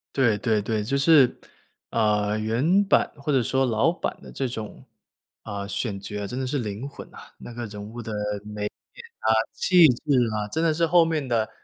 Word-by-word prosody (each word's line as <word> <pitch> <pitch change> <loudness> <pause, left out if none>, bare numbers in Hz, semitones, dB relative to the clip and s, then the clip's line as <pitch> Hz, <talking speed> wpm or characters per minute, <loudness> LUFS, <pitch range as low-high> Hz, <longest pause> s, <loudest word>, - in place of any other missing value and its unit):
对 115 -6 +3
对 110 -1 +1
对， 110 +1 -1
就 135 +7 -1
是， 140 -3 +5 0.5
呃， 105 -1 +1
原 130 - +2
版 - - +3
或 140 +1 -2
者 130 -3 +3
说 135 +3 +1
老 120 +6 +2
版 - - -4
的 - - -12
这 135 - -2
种， 110 -3 -7 0.6
呃， 100 -1 -5
选 100 0 -3
角 105 +1 -5
啊， - - -3
真 125 +6 -5
的 130 - -2
是 145 +2 -1
灵 110 +3 -4
魂 - - -11
呐。 - - -14 0.2
那 120 - -10
个 120 0 -5
人 105 -1 -8
物 115 +3 -8
的 110 -1 -6 0.3
美 105 0 -7
艳 105 - -2 0.6
啊， 110 - +5 0.2
气 175 -3 +5
质 125 -3 0 0.3
啊， 105 -1 -2
真 160 +10 -2
的 165 - +3
是 165 +2 +1
后 170 0 +5
面 160 -4 -1
的， 115 -3 0
115 Hz, 220 characters per minute, -25 LUFS, 105-140 Hz, 0.6 s, 是